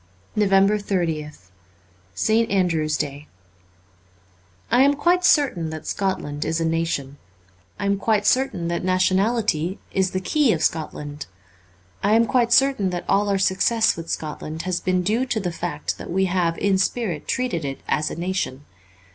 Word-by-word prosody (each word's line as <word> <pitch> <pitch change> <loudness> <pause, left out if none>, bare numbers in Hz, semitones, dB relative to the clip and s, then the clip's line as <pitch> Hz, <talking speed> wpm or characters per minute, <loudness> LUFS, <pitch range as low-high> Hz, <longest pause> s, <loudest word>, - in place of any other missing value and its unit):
369 195 -2 +2
NOVEMBER 155 -2 -3
30th 90 -12 -17 0.6
ST. 220 - +2
ANDREW'S 165 -6 +1
DAY 145 0 -5 1.4
I 245 +2 +5
AM 280 +1 +4
quite 350 +5 +2
certain 255 - +3
that 155 0 -7
Scotland 185 -7 -2
is 160 +1 -1
a 165 - 0
nation; 160 -4 -2 0.6
I 200 - -4
am 200 0 +1
quite 210 -1 +1
certain 255 -10 +1
that 170 - -2
nationality 185 -1 +1
is 190 -1 +1
the 185 - -2
key 255 +6 +2
of 160 - -2
Scotland; 150 -2 -3 0.7
I 205 +2 +3
am 230 +1 +4
quite 240 -2 +1
certain 265 -7 +4
that 175 -1 -4
all 205 +1 +2
our 200 - +2
success 200 +4 +2
with 165 0 -8
Scotland 155 +1 -5
has 185 -1 -1
been 185 -1 0
due 225 +7 0
to 230 - -1
the 180 -4 -2
fact 165 -3 -4
that - - -8
we 190 +2 +1
have 175 -2 0
in 195 -2 +1
spirit 195 -6 -1
treated 250 - -1
it 135 -1 -5
as 155 0 0
a - - -6
nation. 170 -5 -3
185 Hz, 165 wpm, -22 LUFS, 160-215 Hz, 1.4 s, I